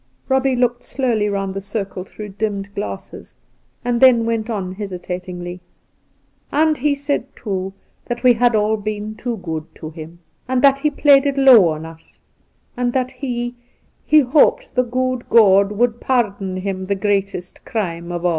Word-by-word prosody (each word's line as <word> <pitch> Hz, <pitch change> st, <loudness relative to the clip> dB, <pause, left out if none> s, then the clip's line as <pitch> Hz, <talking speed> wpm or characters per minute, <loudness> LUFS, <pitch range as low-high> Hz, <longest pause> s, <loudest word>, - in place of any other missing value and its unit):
Eobbie 265 Hz, -1 st, +2 dB
looked 245 Hz, 0 st, 0 dB
slowly 240 Hz, -5 st, 0 dB
round 195 Hz, -1 st, -2 dB
the 195 Hz, -, -4 dB
circle 195 Hz, -2 st, -5 dB
through 210 Hz, +2 st, -9 dB
dimmed 200 Hz, -1 st, -4 dB
glasses, 205 Hz, 0 st, -7 dB, 0.5 s
and 240 Hz, -1 st, 0 dB
thgn 250 Hz, -3 st, +6 dB
went 230 Hz, 0 st, -2 dB
on 195 Hz, -5 st, -3 dB
hesitatingly: 180 Hz, -2 st, -6 dB, 0.5 s
' -, -, -42 dB
And 310 Hz, +1 st, +3 dB
he 285 Hz, +2 st, +1 dB
said, 280 Hz, -2 st, -2 dB
too, 190 Hz, -3 st, -4 dB, 0.3 s
that 240 Hz, 0 st, -4 dB
we 250 Hz, -1 st, +7 dB
had 240 Hz, 0 st, +2 dB
all 215 Hz, +1 st, +2 dB
been 210 Hz, 0 st, -4 dB
too 235 Hz, +2 st, -4 dB
good 160 Hz, -5 st, -5 dB
to 155 Hz, -1 st, -8 dB
him, 165 Hz, +1 st, -10 dB, 0.3 s
and 255 Hz, 0 st, 0 dB
that 275 Hz, -1 st, +5 dB
he 300 Hz, -, +1 dB
had 290 Hz, -, -17 dB
played 285 Hz, -1 st, +5 dB
it 280 Hz, 0 st, -1 dB
low 255 Hz, -9 st, +7 dB
on 155 Hz, 0 st, -4 dB
us; 165 Hz, 0 st, -13 dB, 0.6 s
and 245 Hz, -1 st, -1 dB
that 255 Hz, -1 st, 0 dB
he 245 Hz, -2 st, -4 dB, 0.3 s
— -, -, -41 dB
he 305 Hz, 0 st, +5 dB
hoped 400 Hz, -, +2 dB
the 250 Hz, -, +3 dB
good 255 Hz, 0 st, -2 dB
God 200 Hz, -3 st, +5 dB
would 235 Hz, +2 st, 0 dB
pardon 200 Hz, -7 st, -1 dB
him 190 Hz, 0 st, -4 dB
the 200 Hz, -, 0 dB
greatest 195 Hz, -3 st, -2 dB
crime 170 Hz, -5 st, -4 dB
of 175 Hz, 0 st, -4 dB
aU. -, -, +4 dB
220 Hz, 175 wpm, -19 LUFS, 190-250 Hz, 0.6 s, we